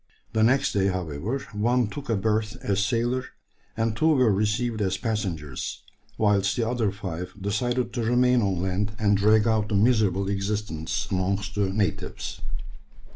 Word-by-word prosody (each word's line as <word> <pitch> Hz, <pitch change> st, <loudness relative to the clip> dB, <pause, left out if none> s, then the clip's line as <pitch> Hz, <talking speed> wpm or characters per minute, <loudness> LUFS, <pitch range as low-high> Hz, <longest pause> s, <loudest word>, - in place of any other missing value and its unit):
The 110 Hz, -, +2 dB
next 135 Hz, +5 st, +3 dB
day, 100 Hz, -1 st, +2 dB
however, 90 Hz, -, -2 dB, 0.2 s
one 120 Hz, +4 st, +2 dB
took 135 Hz, +6 st, -8 dB
a 115 Hz, -, +2 dB
berth 110 Hz, +2 st, 0 dB
as 100 Hz, -4 st, +1 dB
sailor, 120 Hz, +4 st, 0 dB, 0.5 s
and 115 Hz, -1 st, 0 dB
two 155 Hz, -, +2 dB
were 125 Hz, -5 st, +4 dB
received 110 Hz, +3 st, 0 dB
as 95 Hz, -1 st, 0 dB
passengers; 95 Hz, -, -3 dB, 0.3 s
whilst 100 Hz, -1 st, +2 dB
the 115 Hz, -2 st, +1 dB
other 115 Hz, -4 st, 0 dB
five 90 Hz, -4 st, -6 dB
decided 120 Hz, +4 st, -1 dB
to 120 Hz, -, -1 dB
remain 125 Hz, +1 st, +3 dB
on 95 Hz, -4 st, 0 dB
land 100 Hz, +3 st, -1 dB
and 105 Hz, -2 st, +3 dB
drag 105 Hz, +2 st, +4 dB
out 110 Hz, -1 st, +1 dB
a -, -, +2 dB
miserable 100 Hz, -3 st, +3 dB
existence 100 Hz, -4 st, -2 dB
amongst 100 Hz, +2 st, -1 dB
the 100 Hz, -2 st, +1 dB
natives. 100 Hz, +1 st, -2 dB
105 Hz, 155 wpm, -26 LUFS, 100-115 Hz, 0.5 s, were